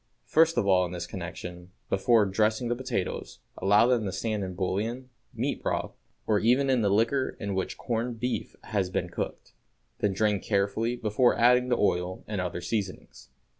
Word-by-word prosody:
First 165 +1 +3
of 120 - +2
all 95 -2 +4
in 90 0 -4
this 85 -1 -4
connection, 90 0 -7 0.2
before 110 +2 +3
dressing 110 +4 +1
the 120 - +1
potatoes 125 -7 -3 0.2
allow 105 +3 +4
them 120 -2 +2
to 95 - -2
stand 105 +2 -2
in 95 -1 -5
bouillon, 110 +7 -2 0.2
meat - - -2
broth, - - -2 0.3
or 105 -2 +2
even 130 +5 +3
in 125 -3 +3
the 100 - +2
liquor 115 +6 +1
in 100 -2 -3
which 95 -1 -2
corned 115 0 -2
beef 125 +2 -3
has 100 -4 -1
been 90 -1 -2
cooked; - - -5 0.5
then 100 -2 +1
drain 105 0 +1
carefully 100 +4 0
before 120 +1 +2
adding 125 +1 +4
the 120 - +2
oil 90 -2 0
and 105 -3 -2
other 90 -1 -3
seasonings. 95 - -4
105 Hz, 175 wpm, -28 LUFS, 95-120 Hz, 0.5 s, all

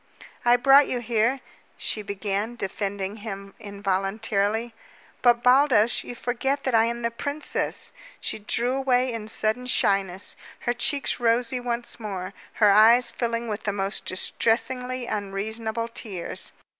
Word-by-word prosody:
"I 240 0 +6
brought 270 +3 +6
you 250 - -1
here 240 +2 +1 0.2
" - - -34
she 215 - -2
began, 200 +2 -3
defending 200 -1 -3
him 200 -2 -7
involuntarily. 200 +3 -1 0.5
"But, 240 -1 +4
Baldos, 250 -3 +4
you 245 - -8
forget 265 +4 -2
that 260 - -1
I 225 0 +5
am 235 +1 -3
the 235 - 0
princess!" 285 +5 -2 0.3
She - - -4
drew 235 +4 0
away 255 -2 +1
in 220 -2 -5
sudden 220 +3 0
shyness, 195 -5 +1 0.3
her 240 - 0
cheeks 280 +3 0
rosy 240 +1 +1
once 240 -1 -3
more, 195 -3 -5 0.2
her 210 -2 +5
eyes 230 +4 +6
filling 235 -1 -2
with 210 -1 -3
the 205 - 0
most 195 0 -2
distressingly 250 +6 0
unreasonable 220 +3 -3
tears. 215 -7 -5
230 Hz, 140 wpm, -25 LUFS, 205-245 Hz, 0.5 s, I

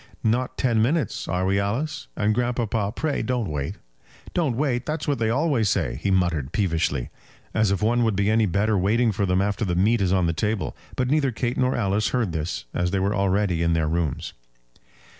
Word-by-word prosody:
"Not 120 +4 0
ten 115 -4 +2
minutes; 145 +7 0
are 90 +2 0
we, 100 +1 +2
Alice? 115 +11 -2
And, 105 +1 +2
grandpapa, 115 -3 0
pray 150 -1 -1
don't 125 -8 -1
wait." 70 -2 -3 0.6
"Don't 150 -9 0
wait! 130 -4 0
That's 155 0 -3
what 140 -4 0
they 110 -1 +1
always 130 -4 +2
say," - - -1
he 100 - 0
muttered, 85 -7 +1
peevishly. 85 - 0 0.4
"As 110 -2 +2
if 100 0 0
one 120 +2 +3
would 110 -3 +1
be 100 +1 +1
any 110 -1 +3
better 100 +4 +1
waiting 110 +5 +2
for 100 0 -1
them 90 +1 +2
after 105 +3 -1
the 90 -4 0
meat 105 +5 +3
is 95 -2 +1
on 95 -2 +3
the 85 - +1
table." 105 +3 -2 0.2
But 125 -1 0
neither 145 -3 +2
Kate 120 +2 -2
nor 130 0 +1
Alice 105 -1 +1
heard 120 -7 0
this, 80 -3 -3
as 90 0 0
they 95 +1 0
were 100 +2 +1
already 100 -3 +1
in 85 0 +2
their 80 -1 +1
rooms. 80 -3 -2
105 Hz, 205 wpm, -24 LUFS, 90-120 Hz, 0.6 s, one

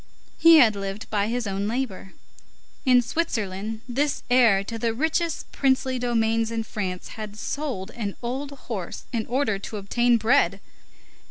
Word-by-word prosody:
He 330 0 +8
had 230 -8 +6
lived 195 +1 -5
by 205 -1 +1
his 240 +1 -2
own 200 0 -2
labor. 220 -5 -3 0.7
In 250 -2 +5
Switzerland, 220 - -2
this 280 +4 -1
heir 230 -6 +5
to 225 +3 -6
the 230 0 0
richest 320 +4 -1
princely 260 -1 +1
domains 225 -2 +1
in 230 -1 -2
France 185 -5 -4
had 215 -1 -7
sold 255 -7 -4
an 210 -4 -4
old 265 +4 -3
horse 225 -10 -6
in 225 -2 -1
order 235 -5 0
to 210 - -6
obtain 240 +4 +2
bread. 220 -5 +3
230 Hz, 150 wpm, -25 LUFS, 205-255 Hz, 0.7 s, He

